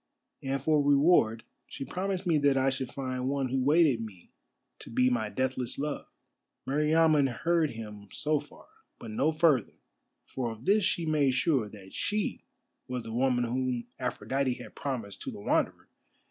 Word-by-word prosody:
And 135 0 -1
for 150 +2 +3
reward 140 -6 +4 0.2
she 135 - -6
promised 190 +2 -3
me 165 -4 +3
that 140 -1 +3
I 135 0 +3
should 130 -1 -4
find 130 -1 -3
one 135 -2 -1
who 130 0 0
waited 145 -4 +4
me 100 -6 -10 0.5
to - - -11
be 125 +2 +3
my 110 -3 0
deathless 130 0 -1
love." 145 +1 -3 0.6
Meriamun 150 +1 +4
heard 165 +4 +1
him 105 -3 -8
so 150 0 0
far, - - -15 0.3
but 115 - -8
no 140 +8 +2
further, 155 -7 +2 0.5
for 125 -3 -3
of 110 +1 -10
this 205 +2 +4
she 170 -2 +1
made 145 -4 +2
sure, 130 -5 +1
that 100 -2 -13
she 210 -1 -2 0.4
was 125 -1 -4
the 115 0 -7
woman 125 0 +2
whom 125 0 -1
Aphrodite 130 0 -1
had - - -11
promised 115 -8 -4
to - - -4
the - - -9
Wanderer. 100 - 0
135 Hz, 165 wpm, -29 LUFS, 120-150 Hz, 0.6 s, reward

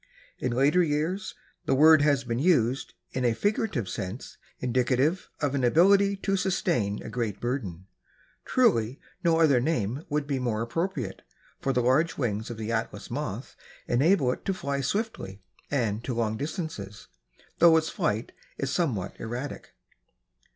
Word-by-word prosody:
In 125 - -1
later 140 +8 +3
years 170 +6 -1 0.3
the - - +3
word 155 +2 +7
has 145 -2 +3
been 115 -1 -2
used 135 -6 +2 0.2
in 130 - -2
a 120 -2 +2
figurative 205 - 0
sense 95 +6 -6 0.2
indicative 130 +7 +1
of 145 -3 0
an 135 -2 0
ability 195 +9 +5
to 195 - +1
sustain 175 - 0
a - - -7
great 115 -5 -2
burden. 105 -9 -3 0.6
Truly 135 - +2 0.2
no 165 -2 +3
other 145 -6 +5
name 130 -1 -1
would 150 0 0
be 140 -2 -1
more 115 -3 -1
appropriate, 130 - -3 0.4
for 135 - 0
the 125 -2 +1
large 135 +7 +2
wings 110 -3 -2
of 120 - -6
the 110 +1 -4
Atlas 115 0 -3
Moth - - -4 0.3
enable 140 +1 +3
it - - -6
to 195 - 0
fly 140 -4 -2
swiftly 135 - -3 0.3
and 115 -5 -1
to 125 - -3
long 110 -2 0
distances, 140 - -5 0.5
though 165 -1 +7
its 160 0 0
flight 110 +3 -1 0.3
is 135 -1 -2
somewhat 130 - -1
erratic. 120 +5 -6
130 Hz, 150 wpm, -27 LUFS, 115-160 Hz, 0.6 s, word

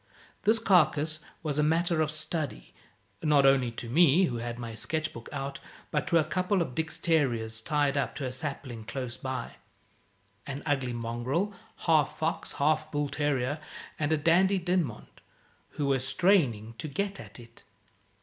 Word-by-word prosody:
This 220 +2 +5
carcase 155 -7 +3 0.2
was 150 -2 -1
a - - +5
matter 165 +2 +2
of 155 - +1
study 155 - -3 0.5
not 150 -3 +4
only 135 -3 +5
to 115 - -6
me, 165 +6 +5
who 125 -10 0
had 120 0 -4
my 115 -2 -6
sketch 155 +8 -3
book 115 - -9
out, 135 0 -4 0.3
but 150 - 0
to 170 -2 +4
a 160 - +4
couple 185 +5 0
of 165 -7 -1
Dick's 160 +3 -2
terriers 120 -9 +1
tied 145 +1 +1
up 140 - -1
to 140 - -3
a 130 - -2
sapling 130 -4 -5
close 120 +1 -5
by 130 -2 -5 0.9
an 140 0 -5
ugly 135 -4 0
mongrel, 120 - -1 0.3
half 155 -4 +3
fox 160 +1 -2
half 155 +2 +1
bull 145 -1 -1
terrier, 145 -1 0 0.4
and 150 0 0
a 160 - +4
Dandie 175 +6 +4
Dinmont 175 - -2 0.6
who 145 - 0
were 135 -1 +2
straining 135 - +2
to 155 - -4
get 200 +7 -2
at - - -11
it. 115 0 -15
145 Hz, 165 wpm, -29 LUFS, 125-160 Hz, 0.9 s, This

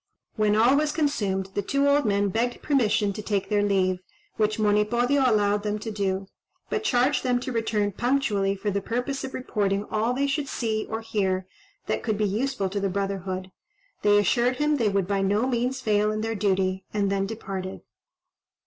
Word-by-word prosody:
When 210 -1 +2
all 235 +5 +5
was 300 +1 +2
consumed, 205 - -1
the 205 - 0
two 275 +7 +1
old 285 0 +3
men 200 -1 +2
begged 235 +4 -1
permission 215 -8 +2
to 215 - -6
take 205 -2 -2
their 205 -1 +2
leave, 190 -3 +1 0.4
which 215 -1 +1
Monipodio 225 +6 +2
allowed 205 -1 +2
them 210 0 -2
to 220 +1 -5
do, 195 -2 -1 0.5
but 430 - -1
charged 260 - +2
them 250 -1 +1
to 255 - -4
return 220 -3 0
punctually, 210 -4 +1
for 205 +1 -2
the 200 +1 -1
purpose 250 +6 -3
of 265 - -5
reporting 205 -5 -1
all 220 +3 +1
they 275 +2 +1
should 280 +1 -1
see 220 -4 -2
or 225 0 -3
hear 190 -4 -1 0.4
that - - -1
could 215 -3 -1
be 210 - +1
useful 215 +1 -1
to 200 - -1
the 195 0 0
brotherhood; 190 -1 -3 0.5
they 205 0 +5
assured 240 +5 +2
him 295 +2 +1
they 225 -5 +2
would 195 -2 +1
by 200 -1 0
no 205 +4 +2
means 255 +1 -1
fail 210 -2 +2
in 215 0 -2
their 225 +1 -1
duty, 190 -2 0
and 200 -2 0
then 195 0 0
departed. 195 -3 -5
210 Hz, 190 wpm, -25 LUFS, 200-245 Hz, 0.5 s, all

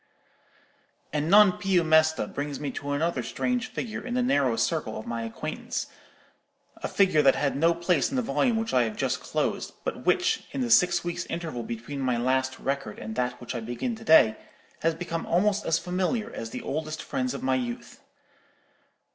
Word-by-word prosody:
"And 150 +1 0
'Non 205 0 +8
più 190 -3 +2
mesta' 160 0 +4
brings 145 0 -5
me 145 -2 -3
to 145 +2 -6
another 165 +4 0
strange 250 -1 -1
figure 225 -3 -5
in 245 0 -4
the 250 - +2
narrow 140 - +2
circle 150 -3 -1
of 110 - -7
my 115 0 -3
acquaintance; 115 0 -4 0.9
a - - -4
figure 185 -6 +3
that 135 -2 +5
had 140 -2 0
no 165 +4 +3
place 170 -2 +1
in 270 - -4
the 255 - +1
volume 240 -1 +1
which 225 0 -2
I 125 - +5
have 110 - -4
just - - 0
closed, - - -2
but - - -4
which, - - +2
in 135 - -2
the 120 -2 -1
six 175 +8 +5
weeks' 175 0 -3
interval 165 -7 -4
between 115 +5 -6
my 130 -3 0
last 130 +2 0
record 135 -6 -3
and 110 +1 -6
that 125 +1 -2
which 120 - -6
I 120 - -3
begin 120 - -3
to 225 - -12
day, 110 - +6 0.4
has 165 0 +1
become 165 -1 -4
almost 205 +4 +1
as 165 - +3
familiar 190 +7 -2
as 115 - -5
the - - -6
oldest 155 +2 -4
friends 130 +1 -2
of - - -6
my 130 0 +2
youth. 120 -2 -4
155 Hz, 190 wpm, -27 LUFS, 125-180 Hz, 0.9 s, Non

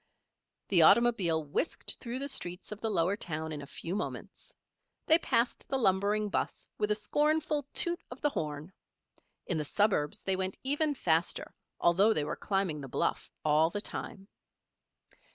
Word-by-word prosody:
The 180 -4 +5
automobile 195 -5 +5
whisked 150 - -3
through 240 0 -4
the 280 +1 -1
streets 180 -10 -4
of 210 - -7
the 225 - 0
lower 185 -1 +2
town 160 -5 -4
in 150 -2 -4
a 140 - -9
few 170 +5 -5
moments. 210 - -6 0.5
They 320 +1 +6
passed 235 -6 0
the 270 - +1
lumbering 205 -1 +2
'bus 200 - -3
with 210 - +1
a 210 - +3
scornful 300 +5 0
toot 345 0 +1
of 245 - -9
the 295 - +1
horn. 150 - -4 0.7
In 170 -4 -1
the - - -1
suburbs 165 -3 +1
they 190 - +1
went 190 0 -2
even 290 +2 +1
faster, 165 -7 0 0.3
although 195 +6 +4
they 150 - +1
were 150 - -3
climbing 195 -7 -1
the 135 - -7
bluff - - -1 0.2
all 155 +2 +4
the 205 - -3
time. 195 -1 -6
195 Hz, 165 wpm, -31 LUFS, 160-240 Hz, 0.7 s, They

